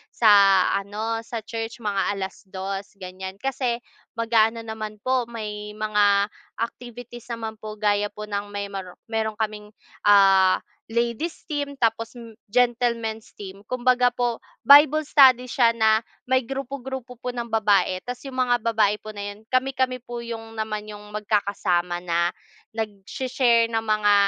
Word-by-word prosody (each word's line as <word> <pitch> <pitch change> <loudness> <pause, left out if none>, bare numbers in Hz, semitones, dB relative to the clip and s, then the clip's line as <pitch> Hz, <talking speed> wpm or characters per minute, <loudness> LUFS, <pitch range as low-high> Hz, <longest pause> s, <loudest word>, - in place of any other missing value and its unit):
sa 200 -4 +6
ano 210 +3 -2
sa 230 -1 -6
church 225 +1 -6
mga 205 -1 0
2:00 195 0 -5
ganyan 190 0 -8
kasi 245 +1 -2 0.3
mag-a-ano 230 0 +2
naman 220 -1 -6
po 255 -2 +1
may 210 -2 -6
mga 210 -1 +2 0.2
activities 240 0 -7
naman 220 -1 -6
po 215 0 -7
gaya 205 -1 +1
po 210 +1 -9
ng 205 -1 -3
may 200 0 -5 0.4
meron 220 -1 -1
kaming, 210 -1 -4 0.3
ah, 195 -2 +6 0.2
ladies 235 +8 -2
team 285 -1 -2
tapos 230 -2 0
m 230 -1 -10 0.2
gentlemen's 235 -1 0
team. 195 -1 -9
Kumbaga 250 0 +3
po, 240 -2 -1 0.2
Bible 295 +2 +7
study 260 -4 +5
siya 235 -3 +4
na 220 -1 +4 0.3
may 260 -1 +3
grupo-grupo 265 -2 -6
po 250 +1 -5
ng 235 -1 -4
babae, 205 -4 +2
tapos 250 0 -6
yung 260 - -9
mga 245 -2 +2
babae 215 -2 +2
po 215 - -9
na 205 -1 -5
yun, 205 - -18
kami-kami 260 0 +1
po 240 -1 -7
yung 225 -1 -7
naman 215 -1 -3
yung 210 0 -10
magkakasama 200 -4 0
na 170 0 +1 0.5
nagsha-share 230 +3 +1
ng 225 - +1
mga 215 -1 +2
220 Hz, 140 wpm, -24 LUFS, 205-245 Hz, 0.5 s, Bible